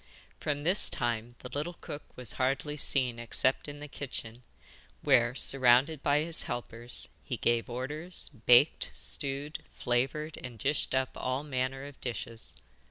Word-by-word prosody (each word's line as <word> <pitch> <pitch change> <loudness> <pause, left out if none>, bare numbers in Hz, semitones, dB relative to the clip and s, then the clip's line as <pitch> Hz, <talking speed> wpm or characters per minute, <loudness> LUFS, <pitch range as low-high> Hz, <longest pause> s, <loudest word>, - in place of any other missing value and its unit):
From 145 -1 -2
this 180 +6 +7
time 120 0 -2
the 125 - -7
little 150 +6 -4
cook 145 - -8 0.2
was 125 -3 -4
hardly 135 +3 0
seen 130 -4 +2
except 125 +4 +2
in 145 0 -8
the 150 - -7
kitchen, 125 -5 -7 0.6
where, 120 +1 +4
surrounded 135 +3 +4
by 145 +1 +2
his 165 +1 +1
helpers, 120 0 -4
he - - -4
gave 120 0 +1
orders, 150 +8 -2 0.2
baked, 125 +5 +5
stewed, 140 +1 -1
flavoured 135 +6 -1
and 120 -2 -8
dished 140 +2 0
up 130 0 0
all 130 +2 -2
manner 135 -1 -2
of 145 -1 -12
dishes. 115 -5 -5
130 Hz, 145 wpm, -30 LUFS, 120-145 Hz, 0.6 s, this